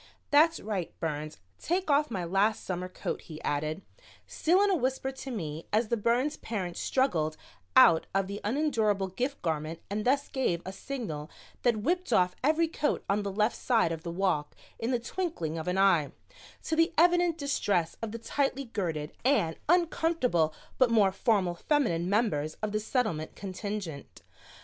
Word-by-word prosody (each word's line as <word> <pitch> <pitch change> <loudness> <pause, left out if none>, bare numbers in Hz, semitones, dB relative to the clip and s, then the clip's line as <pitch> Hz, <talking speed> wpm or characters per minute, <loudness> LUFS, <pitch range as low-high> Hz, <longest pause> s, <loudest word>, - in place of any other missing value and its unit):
"That's 320 +3 +5
right, 200 -5 -4
Burns, 155 -1 -3 0.2
take 355 -1 0
off 290 +1 +3
my 190 -6 -3
last 195 +5 +1
summer 185 0 -3
coat," - - -4
he 155 -2 -10
added, 155 +5 -2 0.4
still 350 +4 +2
in 410 - +3
a - - +3
whisper 265 -2 -1
to 265 0 -8
me 165 - -5
as 215 +1 +2
the 235 - +2
Burns 240 +7 +1
parent 185 -6 -4
struggled 165 - 0 0.4
out 160 - +7
of 195 0 +1
the 200 +2 -6
unendurable 215 -6 +1
gift 255 +9 -3
garment 160 0 -2
and 210 +1 -1
thus 280 +4 +2
gave 175 -11 -1
a 190 - -5
signal 185 - -5 0.3
that 230 -4 +1
whipped 360 +5 0
off 180 0 +3
every 315 +4 +3
coat 305 -2 -1
on 200 +1 +1
the 200 -1 -3
left 210 +3 +1
side 225 -9 +2
of 165 -1 -4
the 170 - -6
walk 170 -4 -1 0.2
in 225 - -2
the 250 - +2
twinkling 235 - -3
of 160 - -6
an 180 +1 0
eye, 180 -7 +4 0.5
to 320 - -1
the 330 +2 +3
evident 350 0 +4
distress 205 - 0
of 225 -2 -3
the 230 - -5
tightly 275 +3 -1
girted 165 -10 -3
and 230 - +2
uncomfortable 325 - +2 0.3
but 255 -2 +5
more 210 -4 +4
formal 195 -3 +1
feminine 175 - 0
members 175 -8 +1
of 215 - -1
the 215 - 0
Settlement 215 - -1
contingent. 195 -6 -6
210 Hz, 170 wpm, -29 LUFS, 175-270 Hz, 0.5 s, out